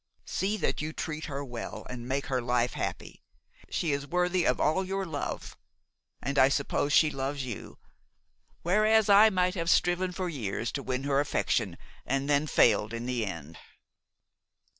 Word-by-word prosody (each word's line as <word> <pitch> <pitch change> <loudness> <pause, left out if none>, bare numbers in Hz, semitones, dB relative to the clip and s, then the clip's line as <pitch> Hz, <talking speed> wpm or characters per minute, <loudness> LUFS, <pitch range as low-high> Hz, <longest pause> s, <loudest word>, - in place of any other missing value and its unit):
See 200 +3 -1
that 180 - -1
you 155 +1 -4
treat 155 0 -4
her 140 -1 -4
well 120 -3 -7
and 120 -1 -7
make 135 +1 -1
her 130 -2 -1
life 125 0 +1
happy! - - -5 0.5
She 165 - -1
is 140 0 -2
worthy 180 +2 +1
of - - +2
all 175 +6 +2
your 195 +1 -2
love, 155 -5 -5 0.7
and 140 +2 0
I 130 - +7
suppose 145 +1 0
she 155 +1 +5
loves 135 0 -3
you, 120 -5 -7 0.9
whereas 215 +4 +3
I 205 +2 +8
might 180 -2 +1
have 170 -3 -2
striven 175 +1 +2
for 185 0 -3
years 120 - -3
to 140 - -3
win 130 0 -3
her 140 0 +2
affection 145 - 0 0.3
and 135 +1 -1
then 145 +1 +2
failed 110 -4 +3
in 115 +1 -4
the 120 -4 -1
end." 85 -4 -7
145 Hz, 165 wpm, -29 LUFS, 125-180 Hz, 0.9 s, I